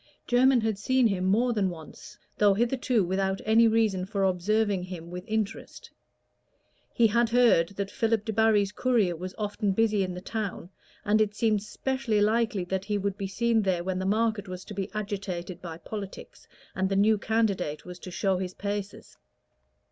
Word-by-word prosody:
Jermyn 250 0 +4
had 220 -2 -1
seen 260 +3 +2
him 190 -4 +1
more 235 +6 +2
than 200 -4 +1
once, 160 -3 -11 0.2
though 205 -2 +5
hitherto 240 0 +1
without 190 +2 -1
any 225 +2 +5
reason 215 -5 +1
for 200 -1 -1
observing 195 +2 +1
him 175 -2 -8
with 180 0 -6
interest; 220 0 -4 1.0
he 235 - +3
had 235 +1 +3
heard 235 -9 +4
that 200 0 -3
Philip 225 -2 0
Debarry's 220 -2 +2
courier 215 -6 +1
was 185 +3 -7
often 205 -1 -1
busy 215 -1 +2
in 185 -1 -2
the - - -5
town, 200 -3 -5 0.3
and 215 +1 +3
it 210 -1 0
seemed 215 -2 +1
specially 230 +1 -1
likely 215 -1 +1
that 190 +2 -3
he 210 0 -1
would 200 -1 -2
be 200 -1 -4
seen 230 +3 +1
there 185 -4 0
when 185 0 -2
the 190 - -2
market 220 0 0
was 185 0 -7
to 210 - -8
be 195 0 -3
agitated 190 -4 -4
by 165 -2 -7
politics, 200 +1 -8 0.3
and 190 0 -1
the 195 - 0
new 210 +2 +3
candidate 200 -9 -1
was 180 0 -9
to 185 - -9
show 190 +1 0
his 185 -1 -5
paces. 205 0 -5
205 Hz, 180 wpm, -27 LUFS, 190-220 Hz, 1.0 s, though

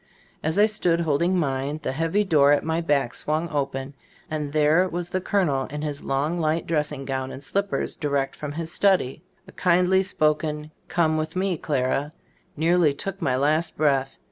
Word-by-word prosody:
As 160 +3 -1
I 205 - +7
stood 175 -6 +1
holding 170 +4 +1
mine, 140 -1 -1
the - - -1
heavy 165 +8 +1
door 150 -7 +4
at 145 - +1
my 160 +1 0
back 145 -6 +1
swung 155 +3 -2
open, 135 -2 -3 0.4
and 150 -2 -3
there 155 +5 +3
was 175 0 -4
the 185 - -1
colonel, 160 -10 +1
in 150 +1 -6
his 145 -2 -4
long, 145 +6 -1
light 160 +1 0
dressing 150 -3 -1
gown 130 -1 -3
and 140 - -9
slippers, 200 +4 -2
di 150 - -3
rect 140 -1 -1
from 145 -1 -6
his 165 +1 -4
study. 180 -10 +2 0.3
A - - -12
kindly 180 +1 +3
spoken 155 -3 0 0.2
"come 160 -2 +1
with 155 +2 -3
me, 185 0 0
Clara," 145 0 -1 0.4
nearly 165 -2 +3
took 195 +6 -5
my 130 -6 +1
last 155 +5 +1
breath. 135 -3 +1
155 Hz, 180 wpm, -24 LUFS, 140-170 Hz, 0.4 s, I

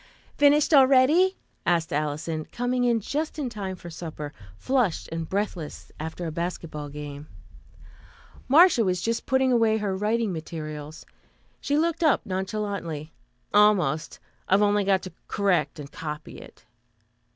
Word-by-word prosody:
"Finished 290 +2 +4
already?" 280 +7 +5 0.3
asked 165 -3 +1
Alison, 155 +2 -2
coming 245 +1 -1
in 235 -2 +2
just 300 +9 -3
in 270 -5 -3
time 195 -4 -4
for 175 -1 -10
supper, 155 -3 -7 0.2
flushed 245 - 0
and 165 -1 -4
breathless 190 -6 -4
after 160 +3 -5
a 160 - -3
basketball 160 -3 -4
game. 145 0 -8 1.2
Marcia 315 -3 +6
was 180 -2 0
just 230 +6 -2
putting 265 0 +3
away 225 -2 +3
her 205 -3 -2
writing 215 +1 0
materials. 155 -2 -7 0.5
She 285 - 0
looked 330 +1 0
up 310 -4 +3
nonchalantly. 190 -5 -4 0.4
"Almost. 195 -8 +3 0.3
I've 195 +2 +5
only 205 -1 +2
to 190 -1 +1 0.2
correct 180 -8 +1
and 145 -1 -9
copy 150 -1 -7
it." - - -15
190 Hz, 130 wpm, -26 LUFS, 160-240 Hz, 1.2 s, Marcia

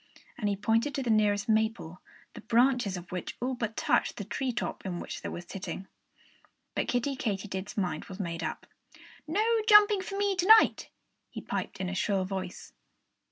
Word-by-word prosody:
And 210 - -1
he 200 - 0
pointed 225 +8 +1
to 275 - -1
the 235 - 0
nearest 205 -2 +2
maple, 220 -6 0 0.3
the - - -10
branches 235 -3 +2
of 175 0 -10
which 180 -1 -5
all 255 +2 -1
but 230 -3 -4
touched - - +1
the 205 - -4
tree 255 +6 -2
top 240 - -4
in 180 -3 -4
which - - -6
they - - -4
were 175 - -6
sitting. 190 +2 -6 0.9
But - - -1
Kiddie 250 +3 0
Katydid's 200 -2 -4
mind 185 -3 -2
was 190 +1 -10
made 170 -3 -3
up. - - -4 0.6
"No 405 +8 +1 0.2
jumping 420 -1 +7
for 390 +1 -5
me 405 -1 +1
to 360 +1 +1
night!" 440 0 +6 0.4
he - - -7
piped - - -4
in 190 - -2
a 185 - -3
shrill 190 0 0
voice. 185 -1 -6
215 Hz, 185 wpm, -29 LUFS, 190-260 Hz, 0.9 s, jumping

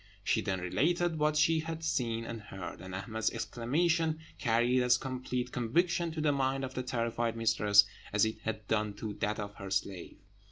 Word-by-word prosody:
She - - +2
then 95 -1 -1
related 165 - +1
what 150 0 +2
she 160 +1 +4
had 165 0 -5
seen 115 -7 0
and 115 -1 -6
heard; 95 -3 -8
and 95 0 -7
Ahmed's 110 +3 -1
exclamation 160 +8 0 0.2
carried 120 +1 +3
as 125 0 +4
complete 125 -1 -3
conviction 170 +8 +1
to 160 - -3
the 150 -1 +3
mind 135 -1 0
of 130 - -7
the 130 - -2
terrified 115 -2 -1
mistress 105 -3 +5 0.3
as 105 +1 +4
it 110 - -3
had 110 -1 -4
done 105 -2 0
to 105 0 -5
that 105 +1 0
of 105 -1 -5
her 100 -1 -7
slave. 95 -1 -3
120 Hz, 185 wpm, -32 LUFS, 105-150 Hz, 0.3 s, mistress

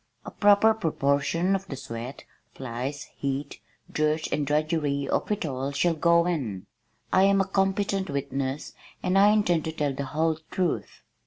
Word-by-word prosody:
A - - -7
proper 205 +2 +5
proportion 160 -1 +1
of 195 0 -4
the 140 - -5
sweat, 120 0 -7 0.3
flies, 130 +3 -4
heat, 140 +1 -3 0.3
dirt 155 +1 +1
and 145 -1 0
drudgery 150 -2 0
of - - -1
it 205 - -1
all 135 -1 -3
shall 170 +4 +2
go 170 +1 +3
in. 125 - -2 0.5
I 190 - +6
am 195 0 +4
a 195 - +3
competent 195 0 0
witness 140 0 -3 0.3
and 180 - +1
I 200 +1 +7
intend 190 -7 +2
to 160 - -2
tell 150 -3 -1
the 140 +1 -4
whole 160 +3 0
truth." 180 -3 -2
155 Hz, 160 wpm, -26 LUFS, 140-190 Hz, 0.5 s, I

